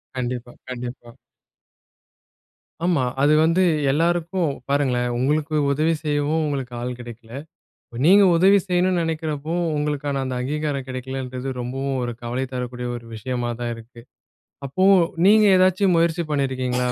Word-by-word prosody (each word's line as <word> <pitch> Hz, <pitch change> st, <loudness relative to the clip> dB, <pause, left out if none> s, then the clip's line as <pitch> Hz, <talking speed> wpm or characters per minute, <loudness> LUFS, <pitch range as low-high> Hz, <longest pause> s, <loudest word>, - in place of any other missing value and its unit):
கண்டிப்பா 125 Hz, -1 st, -4 dB, 0.2 s
கண்டிப்பா. 120 Hz, -1 st, -7 dB, 1.8 s
ஆமா, 170 Hz, -6 st, +2 dB, 0.2 s
அது 150 Hz, +2 st, +4 dB
வந்து 170 Hz, +3 st, +3 dB, 0.3 s
எல்லாருக்கும் 170 Hz, +2 st, 0 dB, 0.2 s
பாருங்களேன்! 130 Hz, -4 st, +1 dB
உங்களுக்கு 150 Hz, +4 st, 0 dB, 0.2 s
உதவி 155 Hz, +4 st, +1 dB
செய்யவும், 150 Hz, +1 st, 0 dB
உங்களுக்கு 135 Hz, -4 st, -3 dB
ஆள் 125 Hz, +1 st, -3 dB
கிடைக்கவில்லை. 115 Hz, -1 st, -11 dB, 0.5 s
இப்போ 120 Hz, -, -12 dB
நீங்க 200 Hz, +3 st, +7 dB
உதவி 195 Hz, +3 st, +6 dB
செய்யவேண்டும் 180 Hz, 0 st, +1 dB
என்று 175 Hz, -, +1 dB
நினைக்கிறப்போ 155 Hz, -1 st, -3 dB, 0.2 s
உங்களுக்கான 145 Hz, -1 st, -2 dB
அந்த 130 Hz, -1 st, -3 dB
அங்கீகாரம் 145 Hz, 0 st, -2 dB
கிடைக்கவில்லை 130 Hz, +1 st, -5 dB
என்றது 130 Hz, +1 st, -6 dB
ரொம்பவும் 135 Hz, +2 st, -3 dB
ஒரு 120 Hz, -1 st, -2 dB
கவலை 125 Hz, +3 st, -2 dB
தரக்கூடிய 125 Hz, -1 st, -4 dB
ஒரு 120 Hz, -1 st, -9 dB
விஷயமாக 120 Hz, +1 st, -3 dB
தான் 120 Hz, 0 st, -2 dB
இருக்கு. 115 Hz, +1 st, -13 dB, 0.6 s
அப்போ 140 Hz, +8 st, -1 dB, 0.4 s
நீங்க 215 Hz, +1 st, +6 dB
ஏதாவது 185 Hz, +1 st, +3 dB
முயற்சி 170 Hz, +1 st, +2 dB
பண்ணி 140 Hz, -2 st, +1 dB
இருக்கீங்களா? 125 Hz, -1 st, -1 dB
140 Hz, 135 wpm, -22 LUFS, 125-160 Hz, 1.8 s, நீங்க